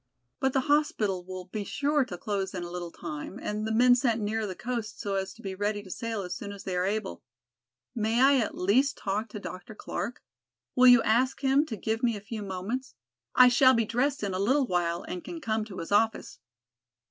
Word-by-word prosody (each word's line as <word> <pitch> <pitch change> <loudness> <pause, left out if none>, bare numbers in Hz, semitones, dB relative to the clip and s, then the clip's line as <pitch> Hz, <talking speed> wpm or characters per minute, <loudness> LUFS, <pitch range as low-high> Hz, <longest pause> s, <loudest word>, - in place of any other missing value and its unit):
But 265 -1 +1
the 265 - +3
hospital 255 -11 +1
will 185 0 -7
be 205 +3 -4
sure 285 +7 +1
to 200 -8 -7
close 195 -1 -3
in 180 - -3
a 175 - -7
little 175 -1 -5
time 155 +4 -7
and 210 +1 -3
the - - -2
men 245 +3 +6
sent 240 -2 +2
nearer 215 +1 -1
the 185 - -5
coast 235 -2 -4
so 200 - -3
as 190 0 -1
to 235 - -16
be 195 -1 -4
ready 205 +1 -2
to 190 - -11
sail 225 -1 -3
as 180 -1 -4
soon 200 +3 -6
as 200 -1 -9
they 185 - -3
are 180 +1 +1
able. 205 - -3 0.7
May 225 0 0
I 275 +2 +6
at 230 -5 -1
least 250 +10 +2
talk 210 +3 -2
to 210 - -7
Dr. 190 +2 -8
Clark? 240 +3 -5 0.5
Will 255 0 +6
you 245 -2 +8
ask 255 +5 +2
him 275 +3 +3
to 220 - -5
give 220 +3 -2
me 235 -3 +1
a - - -7
few 210 +2 -6
moments? 200 +7 -4 0.4
I 255 - +9
shall 260 +1 +6
be 230 -1 +2
dressed 250 +4 0
in 200 -2 -1
a 185 - -2
little 260 +8 +3
while 175 -4 -1
and 180 -1 -6
can 340 - -7
come 220 -7 -1
to 200 -4 -10
his 165 - -6
office." 220 +2 +1
220 Hz, 225 wpm, -28 LUFS, 195-250 Hz, 0.7 s, I